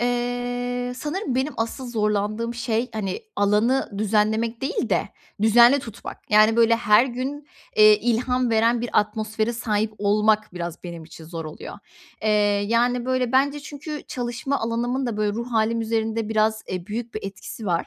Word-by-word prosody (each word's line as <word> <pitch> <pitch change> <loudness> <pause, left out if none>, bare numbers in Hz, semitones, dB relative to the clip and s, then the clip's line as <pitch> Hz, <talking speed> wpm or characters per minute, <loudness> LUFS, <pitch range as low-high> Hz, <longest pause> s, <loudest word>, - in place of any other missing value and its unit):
eee, 245 0 -2
sanırım 295 - -3
benim 265 +4 0
asıl 230 +3 -3
zorlandığım 215 +1 -1
şey, 235 +1 -1
hani, 205 -4 -3 0.2
alanı 210 +6 +2
düzenlemek 220 +2 +1
değil 280 - -1
de - - +1 0.3
düzenli 240 +5 +6
tutmak. 225 -3 -9
Yani, 215 +2 +5
böyle 230 0 +5
her 230 +2 +4
gün, 270 +4 -5 0.3
eee, 430 -1 +7
ilham 250 - +1
veren 230 +1 +3
bir 240 - -4
atmosfere 215 +2 -2
sahip 220 -2 -1
olmak 210 +1 +2
biraz 175 0 -6
benim 170 -2 -7
için 160 0 -12
zor 165 0 -6
oluyor. 155 0 -8 0.5
Eee, 215 - +2 0.4
yani, 240 +1 +2
böyle 255 -2 0
bence 285 +2 +2
çünkü 295 +1 -7
çalışma 245 +2 -2
alanımın 240 +3 -1
da 225 -3 -3
böyle 210 -1 0
ruh 235 +3 -5
hâlim 230 +1 +1
üzerinde 225 -1 -1
biraz, 220 0 +1
eee, 180 -1 -4
büyük 230 +2 -5
bir 215 - -3
etkisi 195 +2 -7
var. 170 -2 0
230 Hz, 160 wpm, -23 LUFS, 215-245 Hz, 0.5 s, eee